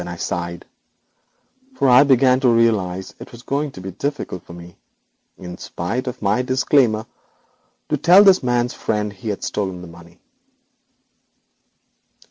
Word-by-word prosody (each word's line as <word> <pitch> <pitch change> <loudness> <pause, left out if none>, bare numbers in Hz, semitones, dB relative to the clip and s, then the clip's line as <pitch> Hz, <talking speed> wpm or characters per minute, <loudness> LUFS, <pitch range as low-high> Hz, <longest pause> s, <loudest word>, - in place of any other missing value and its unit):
I 90 - -6
sighed, 85 0 -5 1.1
for 140 - +1
I 125 +2 +7
began 130 -2 +4
to 130 -2 +3
realise 105 -6 +1
it - - -11
was 120 0 -13
going 145 +2 -2
to 95 - -10
be 95 - -6
very - - -23
difficult 140 - -4
for 85 - -14
me, 85 0 -12 0.6
in 90 -1 -9
spite 115 +10 -4
of 125 - -6
my 105 +4 +1
disclaimer, 125 -3 +1 0.8
to 150 - 0
tell 175 +7 +6
this 195 -2 +5
man's 120 -1 0
friend 105 -1 -3
he 100 +3 -7
had 100 - -4
stolen 95 -3 -4
the - - -9
money. 85 +1 -16
115 Hz, 150 wpm, -20 LUFS, 90-130 Hz, 1.1 s, I